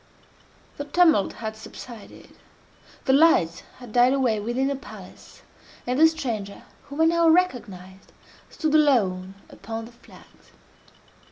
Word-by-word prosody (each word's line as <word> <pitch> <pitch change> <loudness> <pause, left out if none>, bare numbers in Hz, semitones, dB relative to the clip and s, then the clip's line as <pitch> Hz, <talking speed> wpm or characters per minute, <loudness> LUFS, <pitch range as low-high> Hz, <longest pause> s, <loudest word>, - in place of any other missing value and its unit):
The 285 - -5
tumult 320 - +3
had 220 -1 -6
subsided, 220 0 -12 0.7
the 265 - +3
lights 270 - +3 0.2
had 245 -4 -12
died 245 +2 +4
away 250 -6 +1
within 240 +5 -2
the 280 +1 -1
palace, 275 - -13 0.4
and 250 +3 -1
the 320 - +8
stranger, 230 -11 -5 0.2
whom 285 +3 -5
I - - +5
now 335 0 +3
recognized, 200 - -1 0.4
stood 310 -3 -3
alone 195 -11 +2 0.2
upon 225 0 -7
the 235 - -14
flags. 235 - -20
245 Hz, 125 wpm, -24 LUFS, 215-300 Hz, 0.7 s, the